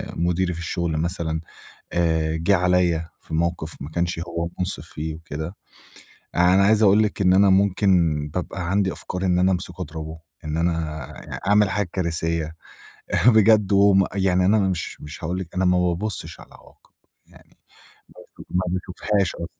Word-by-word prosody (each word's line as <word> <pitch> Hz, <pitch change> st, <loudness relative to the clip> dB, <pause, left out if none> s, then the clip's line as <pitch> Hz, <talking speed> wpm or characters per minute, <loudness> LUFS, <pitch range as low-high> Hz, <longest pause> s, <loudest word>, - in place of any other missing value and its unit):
مديري 90 Hz, +1 st, 0 dB
في 85 Hz, -, -7 dB
الشغل 85 Hz, -2 st, -2 dB
مثلًا، 80 Hz, -1 st, -2 dB, 0.5 s
آآ، 80 Hz, -2 st, +1 dB
جه 90 Hz, +5 st, +3 dB
عليّا 90 Hz, -2 st, +1 dB
في -, -, -8 dB
موقف 85 Hz, -1 st, -1 dB
ما 70 Hz, -, -7 dB
كانش 85 Hz, 0 st, -1 dB
هو 85 Hz, 0 st, -3 dB
منصف 90 Hz, +1 st, -3 dB
فيه 80 Hz, +1 st, -5 dB
وكده، 80 Hz, +2 st, -7 dB, 0.8 s
أنا 90 Hz, +2 st, +4 dB
عايز 110 Hz, +1 st, +4 dB
أقول 105 Hz, +1 st, +5 dB
لِك 105 Hz, -1 st, -2 dB
إن 90 Hz, -1 st, +4 dB
أنا 100 Hz, +1 st, +5 dB
ممكن 100 Hz, +1 st, +3 dB, 0.4 s
بابقى 90 Hz, -1 st, -4 dB
عندي 95 Hz, 0 st, +1 dB
أفكار 90 Hz, +1 st, -5 dB
إن 90 Hz, -1 st, +2 dB
أنا 95 Hz, +1 st, +3 dB
امسكه 90 Hz, -1 st, -4 dB
اضربه، 80 Hz, +1 st, -6 dB, 0.3 s
إن 75 Hz, +1 st, -2 dB
أنا 80 Hz, -2 st, -1 dB, 0.5 s
أعمل 105 Hz, 0 st, +4 dB
حاجة 100 Hz, -2 st, -1 dB
كارثية 80 Hz, -2 st, -2 dB, 0.7 s
بجد 110 Hz, -3 st, +5 dB, 0.4 s
يعني، 95 Hz, -2 st, +2 dB
أنا 110 Hz, +3 st, +4 dB
مش 95 Hz, -4 st, -2 dB
مش 75 Hz, +3 st, -9 dB
هاقول 90 Hz, +3 st, -2 dB
لِك، 90 Hz, -3 st, -7 dB
أنا 95 Hz, +1 st, 0 dB
ما 90 Hz, 0 st, +3 dB
بابصش 90 Hz, +4 st, -2 dB
على -, -, -13 dB
العواقب -, -, -20 dB, 0.4 s
يعني، -, -, -21 dB, 0.6 s
ما -, -, -15 dB
باش -, -, -11 dB
ما 90 Hz, -, +1 dB
باشوفهاش 95 Hz, +1 st, -1 dB
أصلّا. 85 Hz, -, -5 dB
90 Hz, 160 wpm, -23 LUFS, 80-95 Hz, 0.8 s, أقول